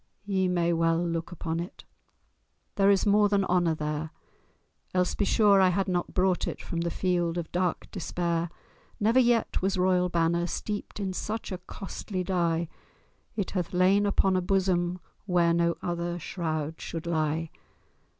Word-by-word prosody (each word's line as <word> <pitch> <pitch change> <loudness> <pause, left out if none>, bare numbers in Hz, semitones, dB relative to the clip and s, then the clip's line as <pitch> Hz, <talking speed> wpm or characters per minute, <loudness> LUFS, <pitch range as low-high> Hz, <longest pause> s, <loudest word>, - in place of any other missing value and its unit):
ye 190 -2 +1
may 175 -1 +1
well 165 0 +2
look 170 0 -2
upon 165 -1 -3
it— 175 +2 -7 0.9
There 195 0 +3
is 200 0 +4
more 205 0 +4
than 200 -1 +2
honour 175 -3 +2
there, 150 0 -3 0.9
Else, 180 0 +2
be 200 - 0
sure, 200 -2 +5
I 185 - +5
had 190 +2 0
not 180 -1 -2
brought 185 -1 +2
it - - -4
From 170 - -4
the 170 - 0
field 175 -1 0
of 170 -2 -4
dark 180 -1 -1
despair. 170 -2 -2 0.5
Never 225 +5 +4
yet 240 -2 +2
was 190 +1 0
royal 180 0 +2
banner 170 0 +1
Steeped 210 +3 -4
in 195 -2 -2
such 215 +4 -4
a 185 - -4
costly 185 +1 -5
dye; 170 -2 0 0.7
It 200 -4 -2
hath 180 -3 -2
lain 195 +3 +4
upon 195 -1 +2
a 185 - +2
bosom 180 -1 +1 0.3
Where 175 -2 +3
no 170 0 +2
other 175 0 -2
shroud 160 -3 -3
shall 165 - -5
lie. 160 -1 -1
180 Hz, 160 wpm, -28 LUFS, 170-195 Hz, 0.9 s, sure